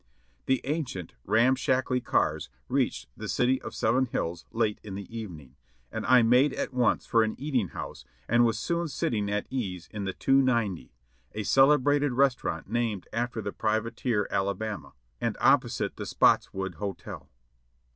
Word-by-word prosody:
The 130 -1 +2
ancient, 135 - -3
ramshackly 130 +2 +2
cars - - 0 0.2
reached 65 - 0
the - - -7
"City 130 +1 +2
of - - -7
Seven 125 +4 +2
Hills" 85 -7 -3
late 110 -2 0
in 100 -3 -7
the 100 0 -6
evening, 80 - -8 0.4
and - - -4
I 125 -2 +6
made 125 +5 +4
at - - -3
once 125 -1 +2
for 115 - +3
an 110 -1 0
eating 130 -7 0
house - - -7 0.2
and 120 +1 +4
soon 170 +9 -1
was 170 -4 -3
sitting 105 -3 0
at 105 0 -1
ease 95 -10 -3
in 105 -2 -4
the 95 - -2
"290," 120 - +1 0.4
a 105 - -3
celebrated 145 +3 +4
restaurant 125 -10 +1
named 110 -3 -2
after 120 -1 -2
the 100 - -4
privateer 110 0 -1
Alabama, 100 +2 -2 0.3
and - - -1
opposite - - +2
the - - -5
Spotts - - +3
wood 95 -3 -4
Hotel. 100 -2 -6
115 Hz, 155 wpm, -28 LUFS, 100-130 Hz, 0.4 s, I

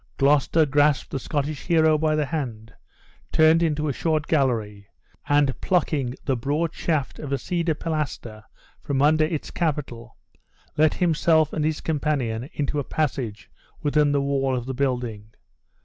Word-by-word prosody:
Gloucester 150 +3 +3
grasped 145 0 +2
the 135 - -2
Scottish 145 +2 -3
hero 160 -2 +4
by 155 0 +1
the 150 -1 +1
hand, 120 -7 -5 0.6
turned 160 +1 +5
into 155 -2 0
a 140 - 0
short 155 +1 0
gallery, 110 -10 0 0.4
and, 145 -2 +2
plucking 150 -8 0
the 135 - +1
broad 145 +7 -1
shaft 155 -5 -2
of 145 -3 -6
a 140 - +1
cedar 170 +2 -1
pilaster 145 -9 -4 0.4
from 140 -1 0
under 155 +1 +4
its 155 -2 -4
capital, 135 -8 -3 0.6
let 155 0 +3
himself 160 -3 +2
and 155 - -1
his 155 0 -1
companion 140 -6 -1
into 145 0 -2
a - - -1
passage 130 -8 -3 0.3
within 150 0 +2
the 140 -1 +1
wall 135 -1 0
of 120 - -5
the 130 - -4
building. 125 -5 -2
145 Hz, 150 wpm, -24 LUFS, 130-155 Hz, 0.6 s, turned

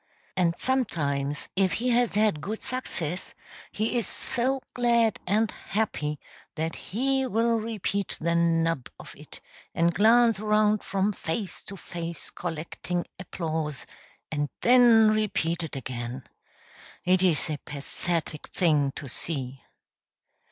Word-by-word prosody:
And 170 -2 +2
sometimes, 150 - 0
if 190 -2 +2
he 250 +2 0
has 240 -3 +2
had 210 -8 +2
good 215 +8 -4
success, 180 -9 -3 0.4
he 225 +3 0
is 230 - -1
so 265 +1 0
glad 235 -3 +3
and 215 +3 +2
happy 150 -9 -2 0.4
that 160 +1 -2
he 265 +5 0
will 230 +1 +2
repeat 205 -3 -2
the 170 +1 +1
"nub" 165 -4 +2
of - - -11
it - - -9 0.3
and 170 +1 +3
glance 230 +1 +5
around 210 0 +3
from 195 +1 0
face 185 +3 -4
to 195 - -8
face, 170 -1 -5
collecting 175 +1 -4
applause, 160 -5 -3 0.5
and 145 -2 -1
then 235 -3 +7
repeat 180 -6 0
it 160 -4 -5
again. 125 0 -5 0.8
It 180 0 +4
is 175 -5 +3
a 150 - -3
pathetic 150 +2 -3
thing 150 -6 +2
to 145 - -7
see. 135 -1 -4
180 Hz, 125 wpm, -27 LUFS, 160-220 Hz, 0.8 s, then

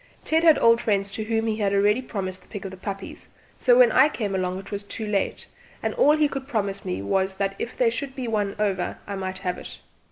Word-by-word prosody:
Ted 320 +1 +2
had 320 -3 +7
old 230 0 +5
friends 200 -3 0
to 215 +2 -4
whom 225 0 0
he 220 -1 -1
had 205 -2 +1
already 205 +4 +3
promised 190 -6 -5
the - - -22
pick 205 -2 -7
of 190 - -5
the - - -8
puppies, 195 +1 -7 0.3
so 245 -2 +5
when 245 -2 +7
I 265 +6 +6
came 210 -9 -3
along 185 -1 -1
it 195 +1 -9
was 200 -1 -3
too 215 +2 -5
late, 205 -2 -1 0.4
and - - 0
all 300 +2 +4
he 305 -1 +4
could 270 -1 -6
promise 200 -6 -2
me 95 +2 -3
was 190 - 0
that 195 0 -1
if 235 - -5
there 240 -3 +3
should 270 +3 -5
be 255 -3 -4
one 205 -3 -1
over 195 -4 -1
I 200 - -5
might 190 -1 -4
have 180 -1 -3
it. - - -8
205 Hz, 250 wpm, -25 LUFS, 195-235 Hz, 0.4 s, had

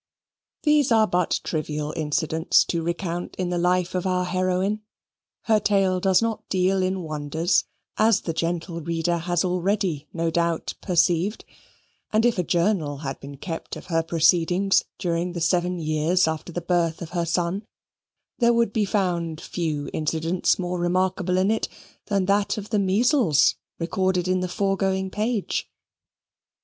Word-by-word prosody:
These 300 -4 +3
are 220 -1 +5
but 180 -4 0
trivial 150 -1 -3
incidents 160 +1 +2
to 170 - -1
recount 170 +1 -3
in 180 -1 -2
the 175 -1 -1
life 180 0 +1
of 185 0 -1
our 180 0 +1
heroine. 185 +3 0 0.6
Her 220 -2 +3
tale 195 -3 +2
does 190 +3 +3
not 225 -2 -1
deal 190 0 +2
in 185 0 -1
wonders, 155 +2 0 0.3
as 220 -1 +4
the 165 - -3
gentle 170 +1 -2
reader 170 +1 -1
has 175 +2 0
already 180 -3 -1
no 165 -1 -1
doubt 170 -1 0
perceived; 180 +2 +1 0.7
and 220 +2 +3
if 235 -5 +2
a - - +2
journal 170 -4 0
had 135 0 -4
been 140 0 -9
kept 165 +3 -6
of - - -10
her 165 - +3
proceedings 175 +4 +3
during 175 0 -1
the 175 - -4
seven 175 +2 +1
years 160 +2 +1
after 160 +2 -3
the 175 - -4
birth 170 -1 0
of 160 - -9
her 175 -1 0
son, 175 +4 -1 0.8
there 235 -1 +4
would 235 -3 +1
be 215 -2 +1
found 175 -5 -1
few 155 -5 -3
incidents 160 +3 0
more 180 -1 -3
remarkable 185 +1 0
in 190 +3 +3
it 225 - 0 0.4
than 200 -2 +1
that 200 +3 +1
of 210 0 -7
the 210 - +2
measles, 200 - +3 0.2
recorded 180 +1 0
in 185 0 +2
the 185 - -1
foregoing 195 -1 0
page. 215 0 -2
180 Hz, 155 wpm, -24 LUFS, 165-195 Hz, 0.8 s, are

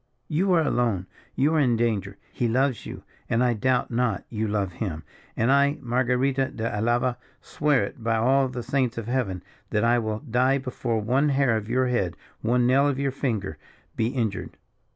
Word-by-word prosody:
You 185 +5 +1
are 165 -2 +4
alone, 115 -10 0 0.3
you 145 +4 +2
are 160 - +3
in 125 -5 +3
danger, 100 -4 -1 0.2
he 120 - 0
loves 130 +1 0
you, - - -8 0.3
and 115 +2 +2
I 125 -1 +3
doubt 125 +3 0
not 115 -5 0
you 110 -1 -2
love 100 -3 -1
him; 85 -6 -4 0.3
and 115 +4 +2
I, 140 +1 +4
Marguerita 130 +2 0
de 110 - -4
Alava, 120 +3 +1 0.2
swears 145 -3 +1
it, 120 - -16
by 115 0 +1
all 130 +4 +3
the 125 -1 -5
saints 125 -3 0
of 115 - -4
Heaven, 115 -7 -2 0.3
that 105 0 0
I 120 +1 +4
will 110 -1 -3
die 130 +1 +2
before 125 -3 -2
one 130 +7 +2
hair 135 -4 +2
of 110 0 -3
your 130 +2 +2
head, 120 -9 -1 0.2
one 120 +2 +2
nail 135 +3 +4
of 140 -2 0
your 140 0 0
finger, 110 - -3 0.4
be 110 - +1
injured. 115 -6 -3
120 Hz, 190 wpm, -25 LUFS, 110-135 Hz, 0.4 s, are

